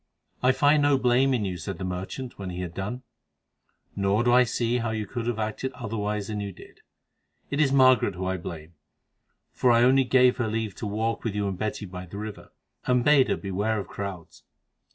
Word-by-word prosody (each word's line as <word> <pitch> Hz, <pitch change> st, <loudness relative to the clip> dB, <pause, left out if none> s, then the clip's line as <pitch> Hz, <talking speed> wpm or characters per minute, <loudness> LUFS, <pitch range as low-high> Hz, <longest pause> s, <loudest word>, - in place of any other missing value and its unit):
"I 125 Hz, -, +5 dB
find 145 Hz, +3 st, +4 dB
no 145 Hz, -1 st, +4 dB
blame 130 Hz, +1 st, +3 dB
in 120 Hz, -5 st, 0 dB
you," 90 Hz, -2 st, -3 dB
said 90 Hz, +2 st, -5 dB
the 95 Hz, -, -6 dB
merchant 95 Hz, +8 st, -5 dB
when 95 Hz, -2 st, -5 dB
he 90 Hz, 0 st, -5 dB
had 85 Hz, -2 st, -5 dB
done, 105 Hz, +8 st, -5 dB, 0.9 s
"nor 100 Hz, +3 st, +1 dB
do 120 Hz, 0 st, +3 dB
I 125 Hz, 0 st, +6 dB
see 120 Hz, +1 st, 0 dB
how 115 Hz, -1 st, -2 dB
you 110 Hz, -1 st, -2 dB
could 120 Hz, 0 st, -5 dB
have 120 Hz, -2 st, -1 dB
acted 110 Hz, +4 st, -3 dB
otherwise 105 Hz, -4 st, -3 dB
than 105 Hz, -1 st, -3 dB
you 100 Hz, -1 st, -4 dB
did. -, -, -15 dB, 0.7 s
It 145 Hz, +2 st, +1 dB
is 140 Hz, -3 st, +3 dB
Margaret 130 Hz, -7 st, +4 dB
whom 95 Hz, +1 st, -4 dB
I 95 Hz, 0 st, -1 dB
blame, 85 Hz, -1 st, -8 dB, 0.8 s
for 125 Hz, -, +1 dB
I 120 Hz, 0 st, +5 dB
only 135 Hz, +2 st, +5 dB
gave 125 Hz, 0 st, +4 dB
her 120 Hz, -3 st, 0 dB
leave 110 Hz, -2 st, -2 dB
to 110 Hz, -, -4 dB
walk 110 Hz, +3 st, -2 dB
with 110 Hz, -3 st, -2 dB
you 105 Hz, -1 st, 0 dB
and 95 Hz, -, -2 dB
Betty 105 Hz, +2 st, -3 dB
by 90 Hz, -1 st, -8 dB
the 100 Hz, -, -9 dB
river, 105 Hz, 0 st, -7 dB, 0.4 s
and 125 Hz, -1 st, +2 dB
bade 145 Hz, -3 st, +5 dB
her -, -, 0 dB
beware 100 Hz, +3 st, -1 dB
of 100 Hz, -, -7 dB
crowds." 95 Hz, -4 st, -7 dB
110 Hz, 215 wpm, -26 LUFS, 100-125 Hz, 0.9 s, I